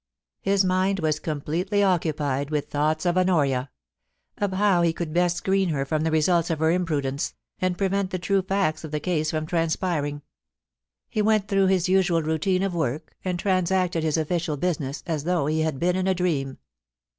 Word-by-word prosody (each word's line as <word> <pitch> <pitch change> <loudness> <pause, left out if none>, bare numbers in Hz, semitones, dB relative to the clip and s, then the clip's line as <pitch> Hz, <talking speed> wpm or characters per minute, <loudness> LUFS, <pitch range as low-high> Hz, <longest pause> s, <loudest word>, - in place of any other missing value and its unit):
His 195 0 +2
mind 185 +1 +1
was 155 -2 0
completely 170 +7 -1
occupied 150 -7 0
with 150 -2 -2
thoughts 155 +3 0
of 175 +1 +2
Honoria 145 -8 +1 0.4
— - - -51
of 205 -2 0
how 190 -2 +3
he 170 -1 +2
could 165 -2 -4
best 175 0 +2
screen 190 +1 +1
her 140 -3 -1
from 155 +2 -1
the 160 - +1
results 165 +2 +2
of 165 - 0
her 160 +1 +2
imprudence, 150 -6 -1 0.2
and 185 -1 0
prevent 195 -1 0
the 185 - -2
true 190 +3 +1
facts 185 -5 -1
of 160 - -6
the 150 0 -2
case 155 -2 -1
from 155 -1 -2
transpiring. 160 -3 -1 0.8
He 215 - -1
went 215 -1 +2
through 195 -1 +3
his 185 -2 +2
usual 180 -3 +2
routine 160 +5 0
of 195 -2 -1
work, 155 -2 -2
and 180 -1 -1
transacted 185 -2 +1
his 155 0 +1
official 160 -1 -1
business 145 -4 -2
as 155 -4 -2
though 175 -4 +1
he 155 +2 0
had 155 -3 -1
been 175 +5 +1
in 185 0 0
a 190 - +2
dream. 145 -7 -1
170 Hz, 190 wpm, -25 LUFS, 155-185 Hz, 0.8 s, how